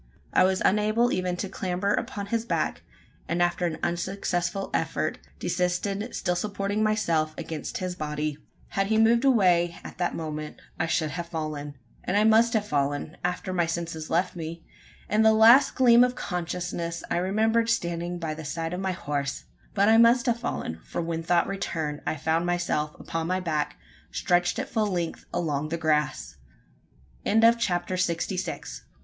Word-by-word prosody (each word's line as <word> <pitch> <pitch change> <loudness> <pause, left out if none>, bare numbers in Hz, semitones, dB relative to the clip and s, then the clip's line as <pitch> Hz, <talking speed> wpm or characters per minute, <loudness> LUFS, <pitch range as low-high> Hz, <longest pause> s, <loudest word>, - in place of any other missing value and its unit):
I 185 - +5
was 190 0 +1
unable 215 +4 +3
even 180 -1 -1
to 195 - -3
clamber 190 +1 -1
upon 200 -1 -3
his 230 -1 +1
back; 235 - -1 0.5
and 170 - -1
after 175 0 +1
an 160 -2 -3
unsuccessful 175 +1 -2
effort, - - -1 0.2
desisted 195 +5 -1
still 180 - 0
supporting 200 +2 -2
myself 170 -8 +1
against 160 -3 -5
his 185 -1 -3
body. 150 -2 -3 0.3
Had 195 0 0
he 220 +1 +2
moved 230 +2 +4
away, 180 -10 +3
at - - -10
the 175 - +1
moment, 155 -1 -5 0.2
I 160 - +1
should 155 -2 0
have 170 +3 -4
fallen. 150 -3 -4 0.3
And 195 - 0
I 210 - +4
must 225 +1 +5
have 215 -2 +1
fallen 145 0 -1
after 180 +1 -2
my 175 -2 +1
senses 165 -2 -4
left 180 +3 +1
me. 165 0 -6 0.4
In 210 +1 +2
the 220 0 +6
last 230 +5 +7
gleam 240 -2 +6
of 250 0 +1
consciousness, 175 -2 -3
I - - +2
remembered 220 +5 +2
standing 175 -4 -1
by 165 -3 -3
the 160 +1 -8
side 165 +3 -3
of 180 - -3
my 190 -1 -1
horse. 140 -5 -3 0.3
But 200 0 +4
I 225 +1 +6
must 235 +2 +5
have 235 -2 +1
fallen: 80 - -4
for - - -5
when 165 0 -2
thought 170 +1 +2
returned, 160 -6 -3
I - - 0
found 160 +3 0
myself 170 -4 -1
upon 165 0 -3
my 185 +1 0
back, 155 -5 -2 0.3
stretched 175 0 +1
at 265 - -2
full 220 -2 0
length 175 -4 -3
along 155 -4 -1
the 165 - -2
grass! 155 - 0 0.9
CHAPTER 215 -5 +3
SIXTY 180 +1 -1
SEVEN. - - -3
175 Hz, 170 wpm, -26 LUFS, 165-205 Hz, 0.9 s, last